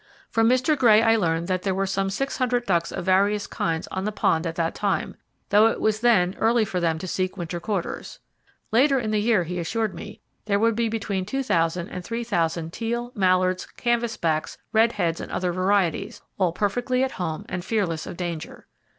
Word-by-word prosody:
From 225 0 +3
Mr. 255 +5 +3
Gray 225 -5 +5
I 225 0 +5
learned 170 -5 0
that 185 -1 0
there 190 -1 -1
were 195 0 0
some 195 0 -1
600 250 +2 -1
ducks 170 -4 +1
of 175 - -5
various 200 +2 +2
kinds 165 -1 -2
on 190 - -3
the 210 - -1
pond 165 -5 +1
at 165 - -4
that 165 -1 -1
time, 200 -1 -1 0.3
though 210 +2 +6
it 225 - -1
was 215 0 +1
then 205 -6 +3
early 225 0 +3
for 185 -3 -2
them 165 -2 +1
to 185 - -6
seek 185 +2 -2
winter 175 -1 -4
quarters. 195 -1 -4 0.5
Later 270 +4 +4
in 220 -4 -1
the 210 -1 +1
year, 215 -4 +3
he 180 +2 -4
assured 215 +4 -1
me, 170 - -9 0.3
there 200 -1 +2
would 225 +1 +2
be 230 0 0
between 205 -4 -2
2,000 180 -7 0
and 180 - -7
3,000 170 -8 -2
teal, 235 +1 -3
mallards, 185 -2 +2
canvas 235 -1 0
backs, 155 -2 -1 0.2
redheads 210 -7 +2
and - - -7
other 180 -1 -1
varieties, 185 -2 0 0.2
all 185 -3 +3
perfectly 245 +7 0
at 265 - -1
home 160 -4 -4
and 180 -1 -4
fearless 180 -7 -1
of - - -7
danger. 170 -3 -5
195 Hz, 195 wpm, -24 LUFS, 175-225 Hz, 0.5 s, though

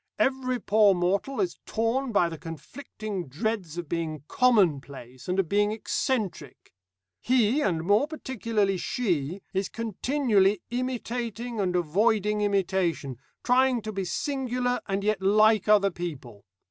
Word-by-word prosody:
Every 260 -2 0
poor 210 -2 +4
mortal 195 +9 0
is 185 -3 -1
torn 235 +4 0
by 180 -5 +3
the 165 -1 -6
conflicting 180 - -7
dreads 175 - -3
of 175 -2 -4
being 160 -3 -3
'common 205 - +3
place,' 130 -3 -12
and 180 +1 -1
of 190 - +1
being 205 +3 +2
'eccentric.' 215 - -3 0.5
He, 250 +3 +2
and 165 - 0
more 205 - +3
particularly 230 - -1
she, 180 - -2
is 190 0 -1
continually 220 -3 +1
imitating 240 -2 -3
and 185 -3 0
avoiding 210 +5 +1
imitation, 185 - 0 0.3
trying 255 0 +3
to 215 - -4
be 195 -2 -3
singular 250 +5 -1
and 195 0 -1
yet 210 -2 0
like 215 +1 +4
other 205 -2 +5
people. 135 -12 -7
205 Hz, 135 wpm, -27 LUFS, 175-235 Hz, 0.5 s, other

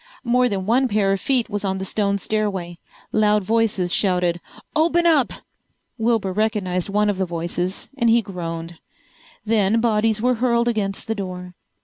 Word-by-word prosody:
More 250 0 +2
than 195 -3 -2
one 250 +5 +3
pair 205 -3 +1
of 195 - -3
feet 255 -4 +2
was 205 -2 -4
on 190 -1 -1
the 190 - -4
stone 200 0 0
stairway. 195 -5 -3 0.3
Loud 210 -1 +3
voices 210 -4 0
shouted, 180 -3 +1 0.3
"Open 335 +2 +3
up!" 310 -6 +4 0.7
Wilbur 225 -4 +1
recognized 200 -4 -1
one 210 +1 +2
of 205 -2 -1
the 190 - +1
voices 175 +2 -3
and 235 -4 +2
he 230 0 +4
groaned. 165 -3 -6 0.7
Then 215 0 +2
bodies 220 -1 +1
were 250 +3 +2
hurled 235 -1 +2
against 205 -4 -1
the 225 - -1
door. 180 -3 -6
210 Hz, 160 wpm, -21 LUFS, 185-230 Hz, 0.7 s, up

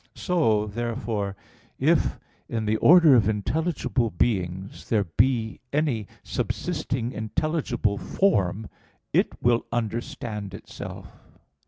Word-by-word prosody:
So 115 - +2
therefore, 110 -2 -3 0.4
if - - +2 0.3
in 115 -2 -2
the 110 +1 +1
order 165 0 +7
of 110 -5 +5
intelligible 130 - 0
beings 95 -1 -2
there 105 -3 +3
be 110 +4 +1
any 140 -8 0 0.2
subsisting 125 -2 -2
intelligible 115 -2 -1
form, 105 - +1 0.5
it - - +4 0.2
will 120 0 +3
understand 110 -3 -3
itself. - - -9
115 Hz, 100 wpm, -25 LUFS, 105-130 Hz, 0.5 s, order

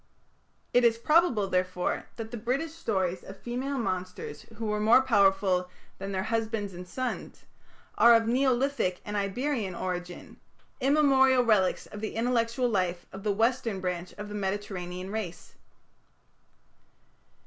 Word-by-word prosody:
It 245 - +5
is 230 -1 +4
probable, 255 - +3
therefore, 185 -1 -1
that 225 -1 -7
the - - -4
British 255 +8 -2
stories 190 - -1
of 195 - -10
female 255 +6 -3
monsters 185 -5 -4
who 225 - -4
were 210 0 -1
more 225 +5 +6
powerful 195 -5 +3 0.3
than 195 +1 -5
their 190 -1 -1
husbands 220 -2 -2
and 180 +1 -9
sons, 255 +5 -5 0.5
are 235 0 +8
of 225 0 +3
Neolithic 255 -5 +1
and 210 - -4
Iberian 205 0 -1
origin 180 0 -5 0.4
immemorial 265 -2 +4
relics 210 -5 +2
of 210 - -9
the 215 - -4
intellectual 235 +1 +1
life 185 -5 -1
of 195 - -7
the 210 +1 0
western 225 -1 0
branch 180 -1 -3
of 210 0 -7
the 205 - -8
Mediterranean 190 -2 -4
race. 205 -6 -5
210 Hz, 135 wpm, -28 LUFS, 190-245 Hz, 0.5 s, are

